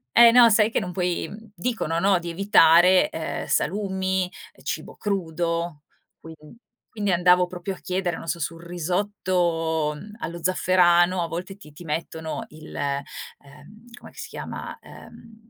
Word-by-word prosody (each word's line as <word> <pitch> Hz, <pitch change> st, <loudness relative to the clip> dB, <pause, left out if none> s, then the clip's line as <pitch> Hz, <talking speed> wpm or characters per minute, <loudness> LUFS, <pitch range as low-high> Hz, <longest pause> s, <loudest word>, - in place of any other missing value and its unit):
E 235 Hz, 0 st, +9 dB
no 240 Hz, -1 st, +8 dB
sai 215 Hz, 0 st, +4 dB
che -, -, 0 dB
non 180 Hz, -5 st, -5 dB
puoi 180 Hz, -1 st, -1 dB
mhmm, 220 Hz, +1 st, -12 dB
dicono, 175 Hz, -5 st, -2 dB
no, 190 Hz, +1 st, +3 dB
di 170 Hz, 0 st, -6 dB
evitare, 180 Hz, -1 st, +5 dB
uhm, 160 Hz, -1 st, -4 dB
salumi, 190 Hz, -1 st, -1 dB, 0.3 s
cibo -, -, -5 dB
crudo, 170 Hz, -5 st, -2 dB, 0.4 s
quin 160 Hz, 0 st, -11 dB, 0.6 s
quindi 205 Hz, -3 st, -1 dB
andavo 180 Hz, +1 st, +4 dB
proprio 180 Hz, +2 st, -5 dB
a 185 Hz, -, -12 dB
chiedere, 180 Hz, -2 st, -2 dB
non -, -, -10 dB
so, -, -, -1 dB
sul 165 Hz, +2 st, -4 dB
risotto, 170 Hz, -3 st, -1 dB
mhmm, 205 Hz, +8 st, -11 dB
allo 170 Hz, -4 st, -6 dB
zafferano 180 Hz, -1 st, +3 dB
a 170 Hz, -, -3 dB
volte 180 Hz, +4 st, -6 dB
ti 150 Hz, -6 st, -15 dB
ti 160 Hz, -, -12 dB
mettono 160 Hz, +5 st, -4 dB
il, 155 Hz, -5 st, -13 dB
uhm, 145 Hz, +6 st, -7 dB
com'è -, -, -13 dB
che -, -, -24 dB
si -, -, -6 dB
chiama? -, -, -7 dB
Uhm, 225 Hz, 0 st, -15 dB
180 Hz, 155 wpm, -24 LUFS, 165-195 Hz, 0.6 s, E